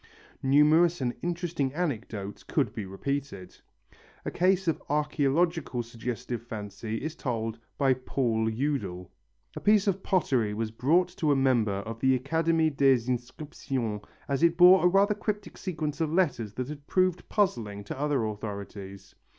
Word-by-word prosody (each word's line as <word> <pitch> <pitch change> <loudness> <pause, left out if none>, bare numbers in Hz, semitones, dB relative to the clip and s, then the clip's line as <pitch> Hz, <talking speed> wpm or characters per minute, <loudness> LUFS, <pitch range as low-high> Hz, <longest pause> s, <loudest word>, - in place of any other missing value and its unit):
Numerous 155 +5 +4
and 125 -2 -1
interesting 170 -6 -2
anecdotes 115 - -3
could - - -1
be 100 - -5
repeated. 100 -1 -4 0.7
A - - -2
case 185 +1 +2
of 165 - 0
archæological 150 -1 +1
suggestive 120 +1 -5
fancy 110 0 -5
is 155 +1 -4
told 115 -4 -3 0.2
by 135 -2 +4
Paul 120 -3 -1
Eudel. 110 -8 -3 0.4
A - - -4
piece 210 -1 +4
of 195 -2 0
pottery 125 - +1
was 110 0 -2
brought 160 +11 +2
to 155 -3 +2
a - - +4
member 120 -7 +2
of 115 +1 -6
the 130 0 +3
Académie 160 +3 +1
des 135 -4 +4
Inscriptions 125 -3 -3 0.3
as 140 0 -1
it 170 0 +4
bore 180 +1 +8
a - - +7
rather 200 +3 +4
cryptic 210 0 -4
sequence 155 -4 -4
of 155 -2 0
letters 135 - 0
that 130 +1 -3
had 145 -1 -9
proved 185 -1 +1
puzzling 115 - 0
to 100 - -7
other 145 -5 +1
authorities. 100 -2 -7
135 Hz, 150 wpm, -28 LUFS, 115-165 Hz, 0.7 s, bore